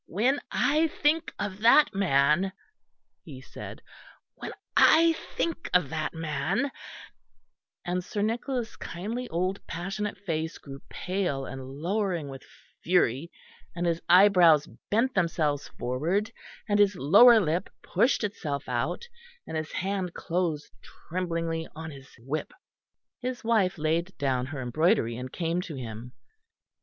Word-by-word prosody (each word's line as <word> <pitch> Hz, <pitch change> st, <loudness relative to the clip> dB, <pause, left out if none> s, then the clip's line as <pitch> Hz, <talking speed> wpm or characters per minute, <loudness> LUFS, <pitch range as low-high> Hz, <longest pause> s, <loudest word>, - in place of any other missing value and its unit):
When 250 Hz, +10 st, +1 dB
I 310 Hz, +3 st, +3 dB
think 315 Hz, +1 st, +1 dB
of 200 Hz, -1 st, -4 dB
that 235 Hz, +6 st, +6 dB
man," 175 Hz, 0 st, +2 dB, 0.7 s
he 140 Hz, -5 st, -10 dB
said, 130 Hz, -, -10 dB, 0.5 s
"when -, -, -7 dB, 0.2 s
I 330 Hz, +1 st, +6 dB, 0.2 s
think 335 Hz, 0 st, -2 dB
of 180 Hz, -7 st, +3 dB
that 155 Hz, 0 st, -2 dB
man 165 Hz, -, -1 dB, 0.6 s
" -, -, -49 dB
and 180 Hz, 0 st, -1 dB
Sir 205 Hz, +3 st, -3 dB
Nicholas' 235 Hz, +2 st, -2 dB
kindly 225 Hz, +8 st, -5 dB
old 185 Hz, +4 st, -2 dB
passionate 195 Hz, +6 st, -4 dB
face 160 Hz, -4 st, -3 dB
grew 140 Hz, -1 st, -10 dB
pale 180 Hz, -8 st, -2 dB
and 135 Hz, -1 st, -7 dB
lowering 175 Hz, -1 st, -1 dB
with 135 Hz, -1 st, -8 dB, 0.4 s
fury, 165 Hz, -3 st, +2 dB, 0.4 s
and 175 Hz, 0 st, -2 dB
his 170 Hz, -1 st, 0 dB
eyebrows 175 Hz, -5 st, +6 dB, 0.2 s
bent 235 Hz, +5 st, +2 dB
themselves 160 Hz, -5 st, 0 dB
forward, 170 Hz, -, -1 dB, 0.4 s
and 205 Hz, -1 st, +2 dB
his 205 Hz, -1 st, +4 dB
lower 210 Hz, -, +7 dB
lip 170 Hz, -1 st, -1 dB
pushed 235 Hz, +8 st, +2 dB
itself 150 Hz, -9 st, -3 dB
out, 125 Hz, -, -2 dB, 0.4 s
and -, -, -6 dB
his 155 Hz, -1 st, -3 dB
hand 185 Hz, 0 st, -2 dB
closed 165 Hz, -4 st, -2 dB, 0.4 s
tremblingly 165 Hz, -2 st, -2 dB
on 160 Hz, +1 st, -7 dB
his 135 Hz, -1 st, -12 dB
whip. 140 Hz, +6 st, -4 dB, 0.7 s
His 255 Hz, 0 st, -4 dB
wife 215 Hz, -6 st, +2 dB
laid 165 Hz, +4 st, -1 dB
down 130 Hz, -3 st, 0 dB
her 135 Hz, -2 st, -5 dB
embroidery 125 Hz, -, +2 dB
and 125 Hz, +2 st, -6 dB
came 170 Hz, 0 st, -1 dB
to 170 Hz, -5 st, -7 dB
him. 120 Hz, -1 st, -7 dB
175 Hz, 130 wpm, -27 LUFS, 150-205 Hz, 0.7 s, lower